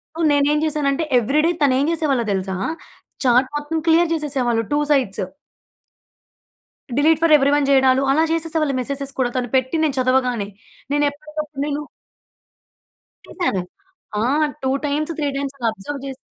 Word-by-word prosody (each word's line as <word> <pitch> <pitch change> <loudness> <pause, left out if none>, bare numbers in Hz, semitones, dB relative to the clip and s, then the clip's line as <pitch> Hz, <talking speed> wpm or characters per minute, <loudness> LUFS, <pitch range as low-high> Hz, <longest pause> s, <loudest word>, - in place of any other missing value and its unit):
So, 330 - -8
నేనేం 290 +1 +3
చేశానంటే 300 0 0 0.2
everyday 300 +8 +2
తనేం 275 0 +3
చేసేవాళ్ళో 285 -7 0
తెలుసా? 190 0 -2 0.7
చాట్ 250 +1 +4
మొత్తం 295 +2 -3
clear 330 +1 +4
చేసేసేవాళ్ళు 260 -7 0
2 290 - +2
sides. 260 -9 +1 1.8
Delete 315 +2 +4
for 320 -2 +5
everyone 280 +1 +2
చేయడాలు 265 -1 +4
అలా 315 +3 +3
చేసేసే 330 0 -1
వాళ్ళు 280 -3 0
మెసేజెస్ 275 +1 -4
కూడా. 245 - +2
తను 245 -2 -2
పెట్టి 260 +4 +1
నేను 285 -3 +1
చదవగానే. 250 -5 +1 0.5
నేనెప్పటికప్పుడు 295 0 -2
నేను 295 0 -2 1.5
చేసాను. 270 - -1 0.6
ఆ! - - 0 0.4
2 265 - +1 0.2
టైమ్స్, 300 +3 -1
3 295 -2 -1
టైమ్స్ 275 0 -4
అలా 235 - -1
అబ్జర్వ్ 255 +7 -7
జేసి 270 -1 -7
280 Hz, 135 wpm, -20 LUFS, 260-305 Hz, 1.8 s, for